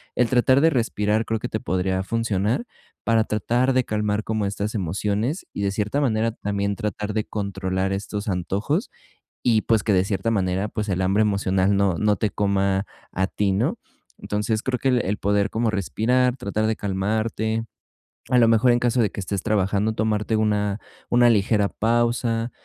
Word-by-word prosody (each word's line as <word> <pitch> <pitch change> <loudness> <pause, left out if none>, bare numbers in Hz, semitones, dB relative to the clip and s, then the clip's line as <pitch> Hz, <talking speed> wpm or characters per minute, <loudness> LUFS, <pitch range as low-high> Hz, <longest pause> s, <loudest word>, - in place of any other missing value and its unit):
El 125 -2 +2
tratar 130 +2 +4
de 165 - +5
respirar 110 -4 0
creo 110 0 -1
que - - -4
te 110 - -2
podría 95 0 -1
funcionar, 115 - -1 0.4
para 115 -1 +3
tratar 120 +5 0
de 130 0 +3
calmar 105 0 -1
como 110 -2 -1
estas 100 +2 -3
emociones 105 - -2
y - - -4
de 100 - +1
cierta 105 +7 -1
manera 115 -4 +1
también 100 -2 -2
tratar 105 +1 -3
de 110 0 0
controlar 95 -2 -2
estos 105 +2 -4
antojos, 100 - -1 0.5
y 115 -3 +3
pues, 110 -2 +2
que 110 - +1
de 90 -1 +4
cierta 100 +2 -1
manera, 95 -2 0
pues, 105 0 -4
el 95 -1 0
hambre 95 +3 +2
emocional 100 -1 +1
no 100 -2 +2
no 105 +2 +2
te 105 - 0
coma 100 0 0 0.3
a 95 - 0
ti, 100 0 0
¿no?, 95 - 0 0.4
entonces, 105 +1 -1
creo 130 -1 -1
que 135 - +1
el 125 -1 +3
el 105 +2 -1
poder 100 0 +1
como 115 +1 0
respirar, 125 +6 +1
tratar 110 -2 -1
de 110 - +1
calmarte, 110 +3 -1 0.6
a 125 - +3
lo 120 -2 +6
mejor 115 +2 +4
en 120 - +3
caso 120 0 +2
de 105 - +2
que - - -7
estés 100 0 -3
trabajando, 105 0 +1
tomarte 110 0 0
una 105 -2 +1 0.3
una 120 0 +5
ligera 105 -1 +2
pausa, 115 0 0
105 Hz, 180 wpm, -23 LUFS, 100-115 Hz, 0.6 s, lo